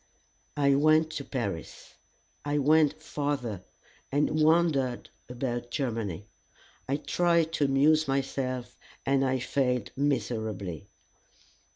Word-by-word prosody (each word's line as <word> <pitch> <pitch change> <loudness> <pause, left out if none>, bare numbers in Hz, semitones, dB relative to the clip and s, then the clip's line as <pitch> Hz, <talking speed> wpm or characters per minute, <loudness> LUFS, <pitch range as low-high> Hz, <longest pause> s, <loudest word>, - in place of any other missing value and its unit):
I 140 -1 +4
went 155 +3 +4
to 140 - -4
Paris. 100 - -5 0.5
I 145 0 -1
went 155 +1 +3
farther, 140 - -3 0.5
and 150 +2 +1
wandered 155 -6 +2 0.2
about 120 -1 -3
Germany. 115 - -3 0.6
I 140 - +1
tried 170 +1 +1
to 145 - +2
amuse 150 +3 +3
myself, 130 -2 -2 0.3
and 135 0 +2
I 130 0 +1
failed 125 -2 -1
miserably. 110 - -2
135 Hz, 100 wpm, -28 LUFS, 120-150 Hz, 0.6 s, I